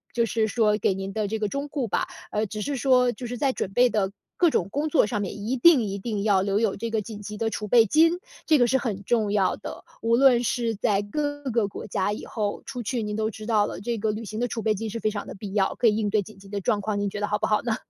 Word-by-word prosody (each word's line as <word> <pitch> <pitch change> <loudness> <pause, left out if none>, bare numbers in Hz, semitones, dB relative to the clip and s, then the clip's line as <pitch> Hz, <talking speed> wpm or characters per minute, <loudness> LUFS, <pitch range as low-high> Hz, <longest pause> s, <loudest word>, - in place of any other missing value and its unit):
就 235 -1 +3
是 220 0 0
说 210 -2 +2
给 190 -2 +1
您 195 0 -5
的 215 -1 -1
这 220 +2 -2
个 215 -1 -1
忠告 280 0 -3
吧。 - - 0 0.2
呃， 210 0 0
只 210 +1 -5
是 285 0 -2
说 250 -1 +3
就 240 +2 -7
是 245 +1 -5
在 270 0 +1
准 195 - -3
备 245 +3 +4
的 200 -2 0 0.3
各 345 -2 +5
种 185 - 0
工 295 +2 -1
作 300 - +4
上 210 -3 -2
面， 200 +1 -4
一 240 +6 -1
定 300 +1 +6
一 200 -1 -3
定 205 -1 -3
要 200 -3 +3
留 200 +1 +1
有 220 -4 +1
这 230 +2 -4
个 220 -1 0
紧 210 0 -8
急 210 +1 -7
的 225 0 0
储 210 0 -4
备 230 +1 +6
金， 330 - +4 0.3
这 310 -2 +5
个 245 - +4
是 265 - +3
很 215 -6 -3
重 215 -1 +1
要 195 -3 +2
的。 - - -8 0.2
无 230 +1 +3
论 250 -1 +5
是 235 -1 0
在 205 -1 +1
各 290 +7 -3
个 225 -3 +1
国 195 - -8
家 205 +2 0
以 - - -7
后 210 -3 -3
出 250 -2 -5
去， 235 +2 -2
您 210 0 -3
都 220 0 0
知 215 0 -9
道 215 -3 +3
了， 180 - -6
这 230 +2 -2
个 215 0 0
旅 215 +2 -5
行 215 +1 -6
的 245 - +1
储 225 -1 -4
备 215 -1 +2
金 220 +2 -4
是 230 +2 -4
非 215 -1 0
常 205 -1 -5
的 - - -7
必 195 0 -7
要， 195 -2 +1
可 240 - +3
以 210 - +4
应 215 -2 0
对 210 0 +2
紧 205 +1 -12
急 195 0 -15
的 200 0 -4
状 205 - +1
况， 205 0 -2
您 205 0 0
觉 210 - -6
得 205 - -1
好 210 0 0
不 - - 0
好 210 - +2
呢？ 230 -2 0
215 Hz, 320 characters per minute, -25 LUFS, 205-240 Hz, 0.3 s, 定